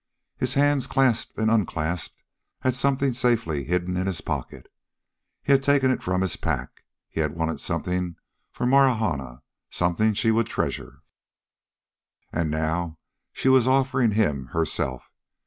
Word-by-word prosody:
His 130 Hz, 0 st, -1 dB
hand 145 Hz, -2 st, +2 dB
clasped 130 Hz, -4 st, +1 dB
and 110 Hz, 0 st, +2 dB
unclasped 90 Hz, -6 st, -1 dB, 0.4 s
at 130 Hz, -, +2 dB
something 135 Hz, 0 st, +2 dB
safely 115 Hz, -, +1 dB
hidden 90 Hz, +2 st, -1 dB
in 95 Hz, +1 st, -1 dB
his 95 Hz, -4 st, -2 dB
pocket. 70 Hz, -6 st, -5 dB, 0.8 s
He -, -, 0 dB
had 135 Hz, -1 st, +5 dB
taken 135 Hz, -1 st, +3 dB
it 130 Hz, -, -1 dB
from 95 Hz, +1 st, 0 dB
his 95 Hz, -2 st, -1 dB
pack; -, -, -4 dB, 0.2 s
he -, -, -6 dB
had 75 Hz, 0 st, 0 dB
wanted 80 Hz, -1 st, -2 dB
something 90 Hz, -1 st, -2 dB, 0.4 s
for -, -, -3 dB
Marahna, 110 Hz, -, +2 dB, 0.3 s
something 100 Hz, +5 st, +1 dB
she 110 Hz, +2 st, +2 dB
would 115 Hz, 0 st, +2 dB
treasure. 70 Hz, +3 st, -4 dB, 1.3 s
And 80 Hz, 0 st, 0 dB
now 80 Hz, +2 st, -2 dB, 0.3 s
she -, -, -3 dB
was 130 Hz, -2 st, +5 dB
offering 130 Hz, -3 st, +2 dB
him 75 Hz, -, 0 dB
herself. 70 Hz, -6 st, -2 dB
100 Hz, 140 wpm, -25 LUFS, 80-130 Hz, 1.3 s, had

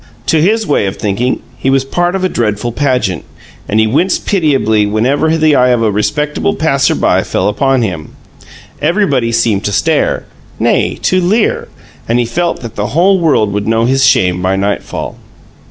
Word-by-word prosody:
To 160 Hz, +1 st, +2 dB
his 215 Hz, +6 st, +1 dB
way 140 Hz, -8 st, +1 dB
of 95 Hz, -, -5 dB
thinking, 110 Hz, +5 st, -2 dB, 0.2 s
he 135 Hz, -, 0 dB
was 135 Hz, 0 st, +2 dB
part 175 Hz, +6 st, -1 dB
of 190 Hz, -, -2 dB
a -, -, +3 dB
dreadful 115 Hz, -, -2 dB
pageant, 125 Hz, -, -1 dB, 0.5 s
and 105 Hz, -, +1 dB
he 110 Hz, -, +4 dB
winced 150 Hz, -, 0 dB
pitiably 135 Hz, -, +1 dB
whenever 140 Hz, +10 st, +1 dB
the 155 Hz, -1 st, +3 dB
eye 125 Hz, -1 st, +3 dB
of 120 Hz, -2 st, +2 dB
a 110 Hz, -, +1 dB
respectable 150 Hz, -, -1 dB
passer 140 Hz, -4 st, +1 dB
by -, -, +2 dB
fell -, -, -1 dB
upon 130 Hz, +4 st, +1 dB
him. 90 Hz, -8 st, -5 dB, 0.7 s
Everybody 150 Hz, -, +1 dB
seemed 115 Hz, -3 st, +1 dB
to 105 Hz, -, -1 dB
stare 100 Hz, -, 0 dB, 0.3 s
nay, -, -, +1 dB
to 185 Hz, 0 st, +2 dB
leer! 210 Hz, +5 st, 0 dB, 0.4 s
And 120 Hz, -, +2 dB
he 120 Hz, -, +1 dB
felt 170 Hz, +9 st, -2 dB
that 115 Hz, -3 st, -7 dB
the 105 Hz, 0 st, -2 dB
whole 190 Hz, +2 st, +4 dB
world 140 Hz, -, +1 dB
would 105 Hz, 0 st, -2 dB
know 115 Hz, +1 st, +1 dB
his 135 Hz, +2 st, +1 dB
shame 90 Hz, -8 st, +2 dB
by 95 Hz, +1 st, 0 dB
nightfall. 100 Hz, +1 st, -3 dB
125 Hz, 180 wpm, -13 LUFS, 105-160 Hz, 0.7 s, he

